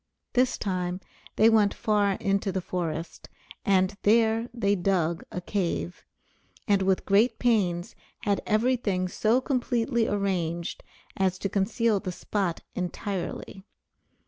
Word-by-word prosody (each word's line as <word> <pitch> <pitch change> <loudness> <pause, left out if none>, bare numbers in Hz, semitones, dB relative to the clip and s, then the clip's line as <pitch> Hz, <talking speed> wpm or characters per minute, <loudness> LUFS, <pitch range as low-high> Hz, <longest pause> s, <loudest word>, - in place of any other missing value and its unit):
This 255 0 +2
time 180 -2 -2 0.4
they 220 - +5
went 215 -3 +4
far 205 -3 +2
into 195 0 0
the 190 - -1
forest, 170 -2 -4 0.3
and 190 0 +2
there 225 +2 +3
they 205 -4 +1
dug 175 -4 0
a - - -3
cave, 170 - -2 0.6
and 200 -2 +3
with 190 0 +1
great 210 +5 +3
pains 190 -8 +1 0.3
had 200 -1 0
every 240 +4 +2
thing 185 -6 -1
so 220 +6 +2
completely 245 -3 0
arranged 175 -5 -2 0.3
as 190 -1 +1
to 195 - -2
conceal 210 +2 +1
the 185 - -4
spot 185 -1 -2
entirely. 190 +1 -4
200 Hz, 125 wpm, -27 LUFS, 185-220 Hz, 0.6 s, they